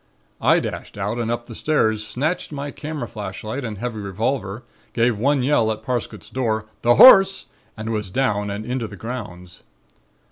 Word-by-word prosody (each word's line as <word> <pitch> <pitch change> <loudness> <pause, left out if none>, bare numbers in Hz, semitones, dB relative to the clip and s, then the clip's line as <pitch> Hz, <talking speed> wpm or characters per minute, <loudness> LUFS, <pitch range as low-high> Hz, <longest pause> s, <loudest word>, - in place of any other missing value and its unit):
I - - +5
dashed - - -6
out 105 +4 -2
and 115 -1 -1
up 120 0 -2
the 120 - -10
stairs, 110 -6 +1
snatched 150 +12 -2
my 145 0 -5
camera 150 0 -5
flashlight 110 +5 -6
and 110 -4 -5
a - - -11
heavy 120 -3 -3
revolver, 105 +2 -2 0.3
gave 120 0 +2
one 140 +2 +2
yell 120 -5 +3
at 110 - -5
Parsket's 125 -3 -4
door: 110 -4 -1 0.2
'The 120 0 +4
Horse!' 195 - +8 0.3
and 110 +1 -4
was 105 -3 -2
down 105 -2 0
and 100 +2 -4
into 125 -2 -2
the 105 - -10
grounds. 90 -7 -7
115 Hz, 175 wpm, -22 LUFS, 105-130 Hz, 0.3 s, Horse